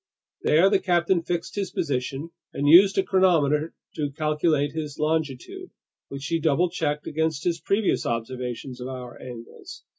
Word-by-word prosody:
There 165 +5 +4
the 195 -1 +3
captain 175 -1 +2
fixed 170 0 -3
his 200 -3 -2
position 140 -1 -3 0.2
and 145 - -1
used 190 +6 +7
a 195 - +4
chronometer 165 -5 +2 0.2
to 145 -2 -1
calculate 150 0 0
his 150 -1 -5
longitude, 160 - -2 0.4
which 140 0 -7
he 165 +3 0
double 160 +3 +2
checked 150 -4 -2
against 160 -1 -1
his 170 -1 0
previous 200 0 +1
observations 125 +2 -4
of 125 - -5
hour 125 -2 -8
angles. 120 -2 -10
155 Hz, 150 wpm, -25 LUFS, 140-175 Hz, 0.4 s, used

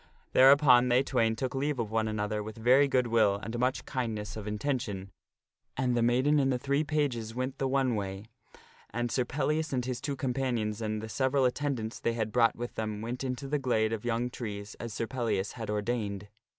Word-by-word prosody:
Thereupon 130 -2 +7
they 125 +2 +4
twain 115 -4 +1
took 130 +3 -3
leave 140 +1 -1
of 115 -3 -3
one 110 0 +1
another 105 0 -2
with 110 +1 -8
very 130 +5 +5
good 130 -2 +2
will 110 -4 +3
and 115 +3 -5
much 125 +1 0
kindness 110 -5 -3
of 110 -1 -6
intention, 105 -4 -3 0.7
and 125 -1 +1
the 120 - +2
maiden 130 +6 +3
and 135 -1 +2
the 125 - +1
three 140 +4 0
pages 130 -8 -1
went 130 +1 -3
the 135 - +1
one 130 -2 +1
way, 100 -1 -4 0.6
and 120 +2 -2
Sir 125 - +1
Pellias 150 +4 -1
and 125 -2 0
his 125 -1 -3
two 140 - -2
companions 125 -5 -1
and 110 0 -2
the - - -4
several 130 +3 +1
at 125 - +3
tendants 130 -7 -3
they 115 - 0
had 110 -2 -2
brought 115 -2 +3
with 120 +1 -5
them 110 -1 -3
went 120 +3 -4
into 130 +1 -3
the 145 +1 0
glade 110 -4 +1
of 110 - -4
young 120 +1 -1
trees 105 -4 -6
as 115 - -5
Sir 115 - -2
Pellias 115 -5 -1
had 115 -3 -7
ordained. 105 -2 -2
120 Hz, 205 wpm, -30 LUFS, 110-130 Hz, 0.7 s, Thereupon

